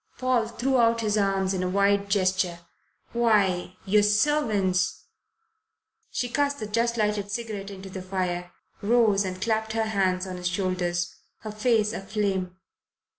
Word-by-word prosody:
Paul 255 Hz, -3 st, +1 dB
threw 255 Hz, +3 st, 0 dB
out 230 Hz, 0 st, +3 dB
his 215 Hz, -1 st, +1 dB
arms 195 Hz, -2 st, +1 dB
in 185 Hz, -, -1 dB
a 185 Hz, -, -1 dB
wide 200 Hz, +1 st, +2 dB
gesture. 185 Hz, -3 st, +1 dB, 0.5 s
"Why 200 Hz, -6 st, +2 dB
your 210 Hz, +2 st, +4 dB
servants 210 Hz, -4 st, +1 dB, 0.6 s
" 445 Hz, +1 st, -50 dB
She 245 Hz, -, -1 dB
cast 285 Hz, +3 st, 0 dB
the 215 Hz, -, -3 dB
just 230 Hz, +3 st, 0 dB
lighted 210 Hz, -2 st, 0 dB
cigarette 210 Hz, -2 st, -4 dB
into 195 Hz, -1 st, -9 dB
the 190 Hz, -, -6 dB
fire, 180 Hz, -1 st, -3 dB, 0.3 s
rose 215 Hz, -2 st, +3 dB
and 185 Hz, -1 st, -4 dB
clapped 220 Hz, +2 st, -1 dB
her 225 Hz, 0 st, 0 dB
hands 190 Hz, -3 st, 0 dB
on 185 Hz, -1 st, -6 dB
his 180 Hz, 0 st, -2 dB
shoulders, 180 Hz, -2 st, -1 dB, 0.3 s
her 215 Hz, -, -6 dB
face 215 Hz, 0 st, +1 dB
aflame. 195 Hz, -3 st, -2 dB
205 Hz, 150 wpm, -26 LUFS, 185-225 Hz, 0.6 s, your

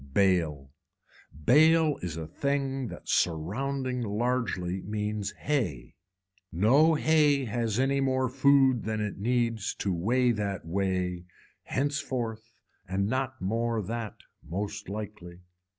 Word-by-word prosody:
Bale, 80 Hz, -8 st, +2 dB, 0.7 s
bale 155 Hz, +2 st, +5 dB
is 85 Hz, -3 st, -4 dB
a 80 Hz, -, -4 dB
thing 135 Hz, -, -2 dB
that -, -, -10 dB
surrounding 125 Hz, -, -1 dB
largely 105 Hz, -5 st, -1 dB
means 105 Hz, 0 st, -3 dB
hay, 115 Hz, -, -2 dB, 0.6 s
no 135 Hz, -, +4 dB
hay 150 Hz, -3 st, +3 dB
has 115 Hz, -1 st, -1 dB
any 135 Hz, +1 st, +2 dB
more 130 Hz, -1 st, +1 dB
food 135 Hz, -1 st, +4 dB
than 110 Hz, 0 st, -2 dB
it 105 Hz, -2 st, -3 dB
needs 115 Hz, -2 st, 0 dB
to 95 Hz, -, -1 dB
weigh 120 Hz, +8 st, +2 dB
that 100 Hz, -5 st, -3 dB
way 90 Hz, 0 st, -1 dB, 0.4 s
henceforward 130 Hz, -5 st, -2 dB, 0.5 s
and 95 Hz, +2 st, 0 dB
not 130 Hz, +1 st, -2 dB
more 115 Hz, +3 st, 0 dB
that 115 Hz, +1 st, -4 dB, 0.3 s
most 100 Hz, +4 st, -5 dB
likely. 100 Hz, -4 st, -7 dB
110 Hz, 115 wpm, -28 LUFS, 95-130 Hz, 0.7 s, bale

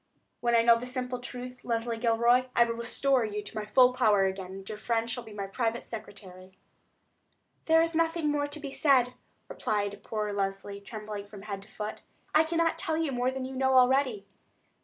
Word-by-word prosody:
When 235 Hz, -1 st, +2 dB
I 230 Hz, -, +5 dB
know 235 Hz, 0 st, +6 dB
the 250 Hz, -, -6 dB
simple 250 Hz, 0 st, -3 dB
truth, 250 Hz, 0 st, -8 dB
Leslie 230 Hz, 0 st, -1 dB
Gilroy, 235 Hz, +2 st, +3 dB
I 235 Hz, -, +7 dB
will 230 Hz, 0 st, -1 dB
restore 245 Hz, +3 st, +1 dB
you 210 Hz, -1 st, -4 dB
into 210 Hz, +1 st, -6 dB
my 215 Hz, -1 st, -3 dB
full 250 Hz, +4 st, +5 dB
favor 210 Hz, -6 st, +4 dB
again, 190 Hz, -1 st, -3 dB
and 195 Hz, 0 st, -9 dB
your 215 Hz, -1 st, -6 dB
friend 230 Hz, 0 st, 0 dB
shall 245 Hz, +1 st, -3 dB
be 220 Hz, -, -12 dB
my 200 Hz, -1 st, -4 dB
private 225 Hz, +3 st, -2 dB
secretary." 200 Hz, -4 st, -9 dB
"Then 190 Hz, -, -26 dB, 1.1 s
there 325 Hz, 0 st, +5 dB
is 335 Hz, 0 st, -1 dB
nothing 330 Hz, -1 st, +1 dB
more 290 Hz, 0 st, 0 dB
to 290 Hz, +1 st, -8 dB
be 285 Hz, -2 st, -6 dB
said," 260 Hz, -4 st, +3 dB, 0.3 s
replied 205 Hz, -1 st, -2 dB
poor 210 Hz, -2 st, -3 dB
Leslie, 200 Hz, 0 st, -3 dB
trembling 210 Hz, 0 st, -7 dB
from 200 Hz, -1 st, -11 dB
head 200 Hz, -2 st, -5 dB
to 200 Hz, -, -16 dB
foot. 210 Hz, +1 st, -6 dB, 0.3 s
"I 310 Hz, -, +6 dB
cannot 330 Hz, 0 st, 0 dB
tell 325 Hz, -4 st, -1 dB
you 320 Hz, -3 st, 0 dB
more 250 Hz, 0 st, 0 dB
than 260 Hz, 0 st, -4 dB
you 265 Hz, 0 st, -6 dB
know 265 Hz, 0 st, +2 dB
already." 255 Hz, -5 st, +3 dB
235 Hz, 200 wpm, -29 LUFS, 210-260 Hz, 1.1 s, I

